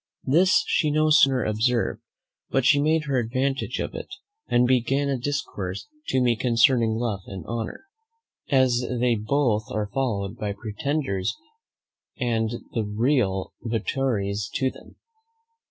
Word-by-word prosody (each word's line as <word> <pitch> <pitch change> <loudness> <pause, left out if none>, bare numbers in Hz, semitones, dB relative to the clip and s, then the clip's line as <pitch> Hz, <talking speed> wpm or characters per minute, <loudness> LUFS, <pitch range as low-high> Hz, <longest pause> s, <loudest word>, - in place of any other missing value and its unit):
This 180 +8 +4
she 155 - +1
no 155 +1 +2
sooner 135 -5 +5
observed 115 +3 0 0.5
but 135 -2 +1
she 145 +2 +5
made 155 +1 +2
her 135 -3 +1
advantage 130 +4 -1
of - - -3
it, - - -6 0.4
and 120 +1 +3
began 130 +3 +2
a 140 - +1
discourse 105 -9 -4 0.2
to 130 - +1
me 120 -2 +3
concerning 115 -1 +3
love 115 -4 -1
and 95 -4 -7
honour, 115 -1 -4 0.7
as 130 -3 +3 0.2
they 125 0 +3
both 110 0 +1
are 105 -1 -3
followed 105 -8 -1
by 105 -1 -3
pretenders 110 -1 -2 0.8
and 115 -3 0 0.2
the 115 - 0
real 105 -2 0
votaries 110 -3 -1
to 130 -1 +1
them. - - -16
120 Hz, 135 wpm, -25 LUFS, 110-135 Hz, 0.8 s, sooner